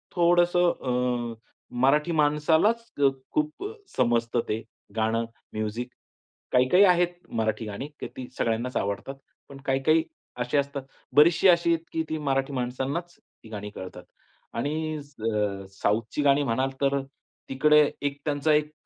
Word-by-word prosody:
थोडंसं 175 0 +4
अ, 125 -2 -1 0.5
मराठी 150 +5 +3
माणसालाच 160 +9 +2 0.2
अ, 140 - +7 0.2
खूप 305 +4 -1 0.3
समजतं 120 -1 +2
ते 110 +1 -1 0.3
गाणं 115 +1 +1 0.3
म्युझिक. 110 +3 -3 0.7
काही, 125 0 +5
काही 185 +7 +6
आहेत 180 -2 +5 0.3
मराठी 110 0 -1
गाणी 105 +7 -5
की - - -4
ती 130 - -6
सगळ्यांनाच 115 +2 -1
आवडतात. 100 +7 -3 0.3
पण 140 - -10
काही, 135 0 +1
काही 160 +2 +4 0.3
अशी 125 +3 0
असतात 140 -1 -1 0.3
बरीचशी 165 +5 +6
अशी 170 -1 +5
आहेत, 165 - -2
की 160 - 0
ती 155 - -1
मराठी 135 -1 -1
माणसांनाच 135 +7 -3 0.3
ती 110 - -13
गाणी 105 -1 -6
कळतात. 95 -2 -9 0.5
आणि 155 +6 -2
अ, 105 -8 -3 0.2
साउथची 110 +7 0
गाणी 140 0 +4
म्हणाल 130 +2 0
तर 140 0 +2 0.5
तिकडे 150 +3 +5 0.2
एक 140 0 -2
त्यांचा 150 +1 +2
एक 150 0 +2
140 Hz, 140 wpm, -26 LUFS, 115-155 Hz, 0.7 s, अ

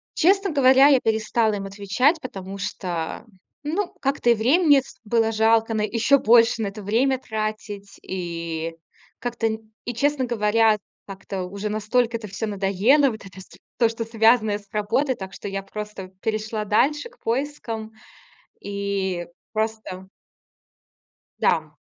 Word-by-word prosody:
Честно 390 +3 +3
говоря, 270 -1 +6
я 270 -3 +5
перестала 220 0 +1
им 195 -1 -5
отвечать, 205 - +1
потому 195 -5 -7
что 175 -2 -4 0.4
ну 355 +5 -2
как-то 275 -3 +1
и 235 - +6
времени 285 +6 +4
с - - -16
было 225 0 +1
жалко 225 +1 +3
на 215 - 0
еще 230 +6 +3
больше 230 0 +5
на 210 - 0
это 205 +1 -7
время 250 +7 +2
тратить 215 -3 -5
и 165 -2 -4 0.4
как-то 235 -1 -2
н 220 0 -5
и 245 - -3
честно 280 +2 +1
говоря 220 -1 +3 0.3
как-то 195 -1 -6
уже 200 +3 -5
настолько 225 +3 0
это 220 -2 -8
всё 200 +3 -4
надоело 210 +8 +3
вот 220 -4 -8
это 190 -1 -12
с - - -15 0.2
то, 230 -2 +4
что 230 0 -4
связанное 220 -2 +3
с 205 - -22
работой, 255 +6 0
так 190 -3 -8
что 205 - -7
я 195 0 -4
просто 210 -1 -7
перешла 215 0 -2
дальше 285 - +1
к - - -25
поискам 230 -4 -3 0.7
и 200 -3 -2 0.3
просто 220 -4 -3 1.3
Да. - - +1
220 Hz, 145 wpm, -23 LUFS, 200-245 Hz, 1.3 s, говоря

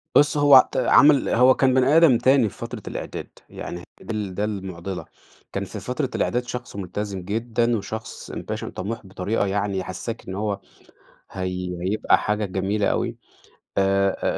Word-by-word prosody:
بُص 145 0 +5
هو 145 -1 +7
عت 130 - +6
عمل 140 +3 +5
هو 125 +2 +6
كان 130 -1 +3
بني 130 +4 +4
آدم 160 -8 +6
تاني 130 -4 +4
في - - -17
فترة - - -6
الإعداد، - - -6 0.2
يعني 85 0 -7 0.2
دي 115 - -5
ال 100 -4 -4
ده 105 - -1
المُعضِلة، 95 -3 -4 0.5
كان - - -2
في - - -7
فترة - - -2
الإعداد 125 +1 0
شخص 125 -2 -6
ملتزم 100 0 -4
جدًا 115 +4 0
وشخص 110 +2 -7
Passion - - -5
طَموح 105 +3 -4
بطريقة 95 +3 -1
يعني، 100 0 -1
يحسِّسك 95 +5 -5
إن 95 - -5
هو 100 -1 -2 0.7
هي 90 -1 -4
هيبقى 100 +4 +2
حاجة 105 0 -1
جميلة 100 +2 -1
أوي، - - 0 0.6
آآ، 95 0 +2
105 Hz, 160 wpm, -23 LUFS, 95-120 Hz, 0.7 s, هو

